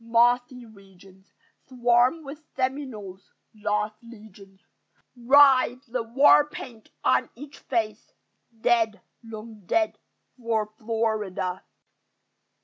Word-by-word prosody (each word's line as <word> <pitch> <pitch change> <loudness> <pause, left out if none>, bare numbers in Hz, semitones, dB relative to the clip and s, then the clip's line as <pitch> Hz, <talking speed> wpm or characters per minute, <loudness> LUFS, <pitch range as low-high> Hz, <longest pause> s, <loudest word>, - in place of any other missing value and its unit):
Mossy 245 +2 +2
regions 195 -2 -19 0.4
Swarm 245 +4 +2
with 290 +2 -9
Seminoles: 255 -8 -5 0.2
lost 210 0 -2
legions 205 -4 -15 0.5
Rise, 260 0 +4
the 250 0 -3
war 275 +5 +4
paint 250 -11 -10
on 130 0 +2
each 280 +3 -12
face 220 -3 -3 0.5
Dead, 225 -3 +2 0.2
long 220 -1 -10
dead 330 -1 0 0.4
for 225 -2 0
Florida! 215 -5 -2
230 Hz, 90 wpm, -25 LUFS, 210-255 Hz, 0.5 s, Rise